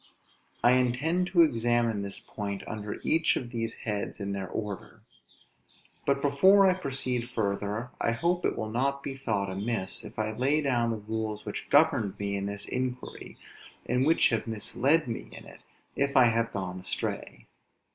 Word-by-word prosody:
I 120 - +7
intend 130 +9 +2
to 175 -2 +6
examine 120 -5 +1
this 100 0 -4
point 100 -2 -5
under 105 -2 -5
each 160 0 +3
of 120 -2 -4
these 115 -2 -2
heads 105 -1 -2
in 100 -1 -3
their 95 -1 -3
order. 105 -3 -6 1.1
But 140 0 +2
before 190 +8 +6
I 185 - +5
proceed 130 -7 -2
further, 105 +1 -2
I 115 - +2
hope 175 +7 0
it - - 0
will 110 -1 -3
not 140 +4 0
be 135 - -4
thought 105 -7 -1
amiss, 100 0 -3
if - - -11
I 110 0 -1
lay 130 +7 +2
down 120 -5 +1
the 115 - -1
rules 110 0 -4
which - - -5
governed 100 -4 +3
me 100 0 -2
in 100 0 -2
this 100 0 -4
inquiry, 125 0 -4 0.5
and 125 +2 +1
which 160 +4 +4
have 115 0 -1
misled 125 +7 +1
me 115 - -5
in - - -10
it, - - -14 0.3
if 140 0 +1
I 130 - +9
have 115 0 0
gone 95 -2 -4
astray. 90 - -4
115 Hz, 170 wpm, -29 LUFS, 105-135 Hz, 1.1 s, I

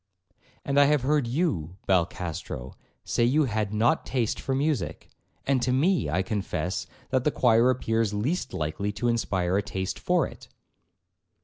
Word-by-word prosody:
'And 140 0 +2
I 145 - +7
have 145 -2 +2
heard 145 -2 +2
you, 105 - -1
Balcastro, 85 -7 -1 0.3
say - - 0
you 140 +6 +3
had 110 -5 -1
not 110 +2 +2
taste 120 -5 -1
for 135 - -2
music; 140 - -2 0.3
and 135 -2 +2
to 125 - +1
me, 135 - +2
I 90 +6 +1
confess, 95 -2 -3 0.2
that 130 - +3
of 130 - 0
the - - +5
choir 120 -3 +4
appears 115 -4 +1
least 125 - -1
likely 80 +7 -2
to 120 +4 -2
inspire 95 -6 +1
a - - +2
taste 95 -1 -4
for - - +2
it.' - - -11
115 Hz, 165 wpm, -27 LUFS, 95-135 Hz, 0.3 s, I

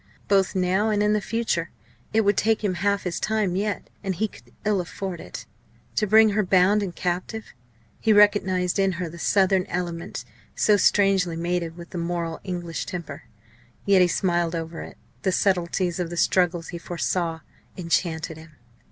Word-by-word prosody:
Both 195 -1 +2
now 190 +4 +2
and 210 -1 +2
in 210 0 +3
the 210 - +1
future. 215 -6 -1 0.4
It 220 - +3
would 205 -1 +2
take 220 +1 +1
him 200 -3 +1
half 200 +3 0
his 180 -2 -3
time 215 -4 0
yet 205 +2 -2 0.2
and 190 -2 -2
he 220 +5 0
could - - -18
ill 205 -3 +2
afford 180 0 -6
it - - -8 0.5
to 210 - +1
bring 220 +2 +6
her 210 +1 +2
bound 190 +2 +4
and 185 -4 -4
captive. 180 +5 -3 0.5
He 225 - +2
recognised 195 -3 +4
in 195 -1 +2
her 175 0 -3
the 170 +1 -10
southern 190 0 +2
element, 170 -2 -4 0.3
so 210 - +4
strangely 195 -4 +3
mated 170 0 -2
with 170 -1 -10
the 175 - -4
moral 170 -1 -3
English 175 -3 -4
temper. 170 -5 -6 0.6
Yet 195 -2 +5
he 180 - +6
smiled 175 -1 0
over 165 0 -5
it. - - -10 0.2
The 190 - +1
subtleties 180 -1 +1
of 175 -2 -2
the 175 - -6
struggle 175 -1 +2
he 170 +1 -7
foresaw 170 -1 -2 0.4
enchanted 165 -2 -1
him. 160 0 -14
185 Hz, 175 wpm, -24 LUFS, 170-200 Hz, 0.6 s, bring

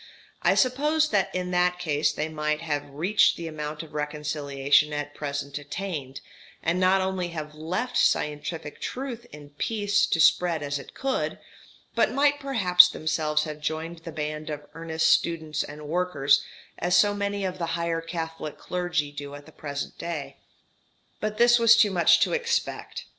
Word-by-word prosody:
I - - +3
suppose 300 +4 +2
that 200 -3 +1
in 180 0 -2
that 180 0 +2
case 155 -4 +1
they 155 - -3
might 150 0 -2
have 145 -3 -3
reached 175 +10 +3
the 170 - -6
amount 150 0 -5
of 155 - -14
reconciliation 150 -1 +1
at 145 0 -4
present 140 -1 -4
attained, 145 -3 -5 0.4
and 170 +2 +1
not 185 +1 +4
only 190 -1 -1
have 155 -3 -6
left 180 +11 -3
scientific 150 +1 0
truth 245 -2 -5
in 145 -1 -12
peace 205 -2 +1
to 165 - 0
spread 165 0 +4
as 145 0 -2
it 140 - -12
could, 270 -1 -1 0.6
but - - +2
might 290 +1 +2
perhaps 185 -10 +6
themselves 155 -2 0
have 150 -1 -6
joined 160 +2 -3
the 165 0 -8
band 150 0 -4
of 150 -1 -5
earnest 160 -1 -1
students 160 -3 +1
and 150 +1 -9
workers, 155 -5 +2 0.4
as 175 +1 +2
so 205 -1 +4
many 200 -1 -2
of 185 0 -4
the 170 - -2
higher 170 -1 -1
Catholic 165 -2 -5
clergy 175 -5 -2
do 145 0 -7
at 145 0 -11
the 160 - -15
present 145 -2 -6
day. 165 -4 -5 0.8
But 215 0 -3
this 240 +1 +6
was 230 -1 +7
too 210 -3 +5
much 175 -3 +5
to - - +2
expect. 470 -1 -2
165 Hz, 165 wpm, -26 LUFS, 150-190 Hz, 0.8 s, was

